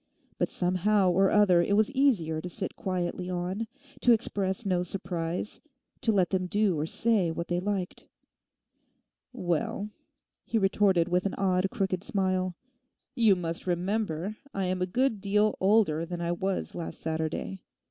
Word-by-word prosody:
But - - +1
somehow 185 +2 +2
or 190 +2 +4
other 195 -5 +5
it 200 +4 +1
was 215 +4 +3
easier 210 - +2
to 180 - -6
sit 190 +2 -4
quietly 180 -1 -3
on, 185 +5 -2 0.3
to 240 - +5
express 205 -2 -1
no 180 -2 +1
surprise, 180 0 -3 0.4
to 225 - +2
let 190 -4 +2
them 185 -1 0
do 205 -1 +2
or 155 - -1
say 215 -3 +2
what 170 +2 -4
they 175 0 +1
liked. 190 -1 -3 1.2
'Well' 210 0 -2 0.5
he 230 - -1
retorted 195 -4 +3
with 180 +2 +1
an - - -4
odd, 190 -1 +1
crooked 190 -5 -1
smile, 185 -3 0 0.6
'you 225 -7 +4
must 170 0 -4
remember 185 +1 -1 0.2
I 195 -1 0
am 185 0 -1
a 180 - +1
good 230 +1 +1
deal 210 +1 +2
older 190 -6 +3
than 175 +1 -5
I 170 0 -1
was 190 +2 -2
last 170 -2 -6
Saturday. 160 +4 -3
185 Hz, 155 wpm, -28 LUFS, 175-205 Hz, 1.2 s, other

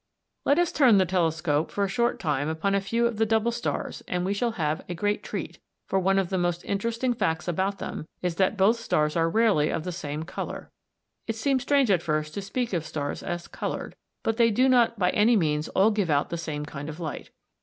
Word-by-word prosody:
] - - -54
Let 285 - +4
us 350 0 +2
turn 255 - +5
the 190 - +4
telescope 160 -4 0
for 200 - -1
a - - +2
short 235 +5 0
time 150 -3 -1
upon 160 +5 -1
a 200 - +2
few 230 +4 0
of 235 -2 0
the 220 - +3
double 225 +1 +2
stars 235 +1 -3
and 180 0 -1
we 195 - 0
shall 230 +3 -1
have 155 -5 -1
a 175 - -3
great 205 +4 0
treat, - - -6 0.3
for 190 - +1
one 195 +1 +2
of 190 -3 +1
the 190 - 0
most 175 0 -1
interesting 230 +5 -1
facts 165 -7 -1
about 190 +3 0
them 155 - -6 0.2
is 180 -1 0
that 195 +3 +2
both 210 +5 +4
stars 150 -9 0
are 165 -1 +2
rarely 200 -7 +3
of 160 - -2
the 180 - -3
same 155 -3 -4
colour. 170 - -6 0.6
It 225 - -2
seems 260 +3 +1
strange 275 -4 +3
at 180 -4 +3
first 155 -1 -1
to 200 - -4
speak 230 +3 -3
of 170 -4 0
stars 145 -2 -4
as 175 0 -4
coloured, - - -5 0.3
but 225 0 0
they 230 -1 +5
do 250 +5 +3
not 240 -3 +4
by 180 -2 +2
any 225 +3 +4
means 150 -5 +1
all 200 +4 +3
give 205 -5 0
out 145 -1 +1
the - - -1
same 150 -2 -4
kind 145 0 -7
of 155 +2 -8
light. 160 -3 -5
190 Hz, 235 wpm, -26 LUFS, 160-225 Hz, 0.6 s, turn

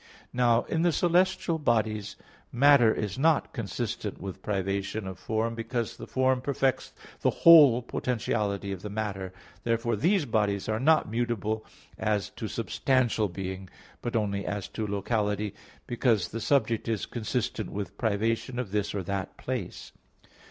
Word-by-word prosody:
Now 120 -1 +3
in 160 - -1
the 175 0 +3
celestial 175 0 +2
bodies 110 -6 0 0.4
matter 135 -3 +6
is 105 +1 -3
not 155 0 +2
consistent 110 -1 -4
with 95 -1 -7
privation 100 +1 -2
of 95 -1 -7
form, 110 +1 -1
because 115 0 -3
the - - -8
form 130 -1 +1
perfects 135 0 0 0.3
the - - +3
whole 145 -8 +7
potentiality 105 -5 -2
of 95 -2 -5
the 105 - -6
matter; 100 -3 -3 0.3
therefore 115 0 0
these 175 - +2
bodies 105 -4 0
are 110 0 0
not 155 +4 +4
mutable 110 -2 -1 0.4
as 105 -2 0
to - - -5
substantial 125 -5 +1
being, 95 +1 -6 0.3
but 120 - -3
only 100 -3 0
as 100 +1 -3
to 110 -1 -4
locality, 105 0 -1 0.3
because 120 -4 +1
the 115 - -5
subject 115 -3 +1
is 110 -5 -1
consistent 120 0 -3
with 100 0 -5
privation 115 +2 0
of 125 -6 -3
this 105 0 -1
or 100 - -2
that 95 +1 -4
place. - - -5
110 Hz, 145 wpm, -28 LUFS, 100-125 Hz, 0.4 s, whole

